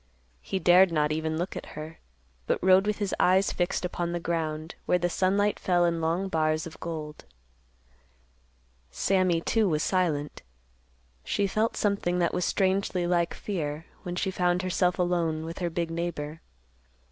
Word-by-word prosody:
He 195 - -3
dared 185 0 +6
not 150 -2 +1
even 160 0 -1
look 175 +3 -3
at - - -6
her, 155 +1 -7 0.5
but - - +2
rode 190 +2 +5
with 210 - 0
his 205 -2 -2
eyes 190 +2 +4
fixed 175 0 -1
upon 175 -1 -3
the 175 - -1
ground, 160 -2 -3
where 180 - +4
the 175 0 -1
sunlight 200 +3 +1
fell 175 -1 +2
in 170 -1 0
long 170 +4 0
bars 155 -3 0
of 165 - -10
gold. 155 -2 -6 1.6
Sammy, 185 - +1
too, 220 +2 +2
was 155 -2 0
silent. 160 -6 0 0.8
She 205 - 0
felt 215 +3 0
something 200 -4 0
that 175 -1 +1
was 180 - 0
strangely 190 -2 +1
like 175 -1 +1
fear, 160 -5 -4 0.2
when 175 0 -5
she 190 +1 -1
found 180 0 +1
herself 180 -1 +1
alone 170 -3 0
with 165 +1 -6
her 175 -2 -1
big 170 0 -2
neighbor. 165 -2 -4
175 Hz, 160 wpm, -27 LUFS, 160-185 Hz, 1.6 s, dared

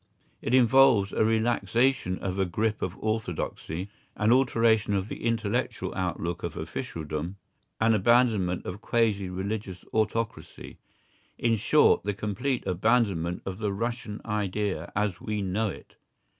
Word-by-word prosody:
It 120 - +1
involves 120 -5 +5
a - - +2
relaxation 115 -1 +1
of 95 -1 -3
the 95 -1 +1
grip 105 +5 -1
of 95 +1 -3
orthodoxy, 100 -3 -3 0.2
an 105 +2 +2
alteration 115 -5 +3
of 100 +2 -2
the - - -7
intellectual 115 -3 -1
outlook 85 -2 -3
of - - -5
officialdom, 80 +3 -4 0.4
an 110 0 +4
abandonment 110 -4 +3
of 95 +4 -6
quasi 105 -6 +1
religious 95 0 -4
autocracy—in 115 +1 -3
short, 135 +8 +4
the 105 0 -2
complete 120 +6 -2
abandonment 95 -3 +1
of 95 +1 -5
the 105 -2 -1
"Russian 115 0 -3
idea" 105 -5 -2
as 105 -3 -1
we 105 -1 -2
know 100 +4 0
it. - - -11
105 Hz, 130 wpm, -27 LUFS, 95-115 Hz, 0.4 s, involves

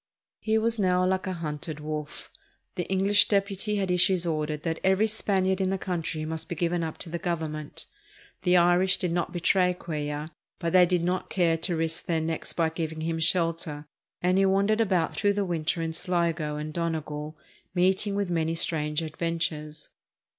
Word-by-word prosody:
He 220 0 +1
was 225 +1 0
now 185 -2 +3
like 190 +1 0
a 190 - -1
hunted 155 -2 -5
wolf. 150 0 -5 0.4
The 180 - -3
Enghsh 195 +2 +4
deputy 200 +1 0
had 195 -3 0
issued 180 0 +3
orders 155 -2 -1
that 165 0 -2
every 190 +3 +4
Spaniard 195 -3 +1
in 190 - +1
the 195 - 0
country 165 -4 -3
must 160 +1 -4
be 170 - -3
given 170 +1 0
up 160 -1 -4
to 170 - -6
the 170 - -3
Government. 160 -4 -4 0.6
The 180 0 +4
Irish 175 +2 +4
did 180 -3 -1
not 175 0 -1
betray 180 +1 +2
Cuellar, 150 -3 -4 0.3
but 170 -3 -2
they 180 -1 +7
did 175 -1 +1
not 180 +1 -1
care 170 -3 +2
to 170 +2 -1
risk 165 0 -1
their 165 -2 +1
necks 160 0 -2
by 165 -2 +1
giving 160 -1 -4
him 165 0 -1
shelter; 165 -3 +1 0.4
and 180 +2 +3
he 195 - +4
wandered 200 +3 +3
about 185 -6 +1
through 205 0 +2
the 200 0 0
winter 165 -1 -1
in 165 0 -2
Sligo 165 -4 -1
and 150 +1 -5
Donegal, 155 -2 -3 0.4
meeting 190 +3 +2
with 200 -3 -1
many 165 -1 0
strange 150 -1 -1
adventures. 155 -1 -3
170 Hz, 180 wpm, -27 LUFS, 160-185 Hz, 0.6 s, they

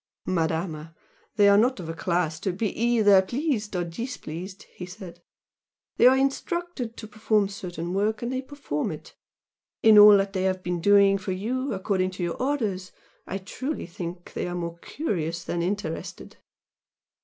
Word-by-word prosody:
"Madama, 165 -2 -2 0.4
they 205 -1 +5
are 200 0 +6
not 250 +1 +2
of 170 - -6
a 165 - -4
class 165 -1 -1
to 190 - -1
be 200 +3 -3
either 220 -4 +5
pleased 235 - -2
or 175 - 0
displeased" 185 - -7
he - - -9
said 180 -1 -10 0.8
"They 240 - +7
are 260 +1 +6
instructed 275 -2 -2
to 220 - -8
perform 215 -1 +1
certain 175 -3 -6
work, 210 +4 0
and 240 +2 -2
they 260 - -1
perform 265 - -4
it. 155 - -10 0.7
In 220 -1 +8
all 205 0 +10
that 195 0 -1
they 190 - -1
have 185 -1 -1
been 175 -1 -2
doing 200 +1 +5
for 190 0 -3
you, 255 +8 -2
according 190 -1 0
to - - -3
your 170 +5 -3
orders, 215 -10 -1 0.4
I 195 - -3
truly 260 +10 -5
think 175 +1 -8
they - - -3
are 175 - -4
more 170 -1 -5
curious 170 - -3
than 170 - -2
interested." 175 -2 -4
195 Hz, 165 wpm, -26 LUFS, 175-225 Hz, 0.8 s, all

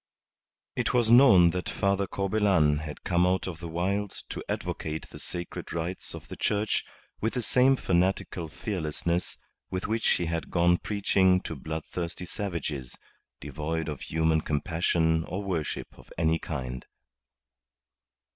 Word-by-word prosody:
It 125 0 0
was 115 -2 +3
known 115 -9 +8
that 90 +1 -3
Father 100 -1 +1
Corbelan 95 -8 +2
had 75 -1 -7
come 90 -1 +2
out 95 +1 +1
of 85 -3 -5
the 85 - -6
wilds 95 +5 -1
to - - -5
advocate 80 0 -3
the - - -9
sacred 85 -1 -5
rights 85 +2 -3
of - - -10
the - - -7
Church 105 0 0 0.4
with 110 +4 0
the 125 - 0
same 130 +4 +4
fanatical 90 -4 0
fearlessness 85 +2 -2 0.3
with 95 0 -3
which 110 +2 +1
he 85 - +2
had 85 0 -2
gone 85 0 +3
preaching 95 -3 +3
to 80 - -5
bloodthirsty 80 +4 -4
savages, 75 -10 -4 0.4
devoid 80 +2 -3
of 75 -3 -5
human 80 0 +1
compassion 80 +1 +1
or 95 +4 -4
worship 85 -6 -3
of - - -17
any 80 0 +2
kind. 65 -5 -5
85 Hz, 140 wpm, -28 LUFS, 80-100 Hz, 0.4 s, known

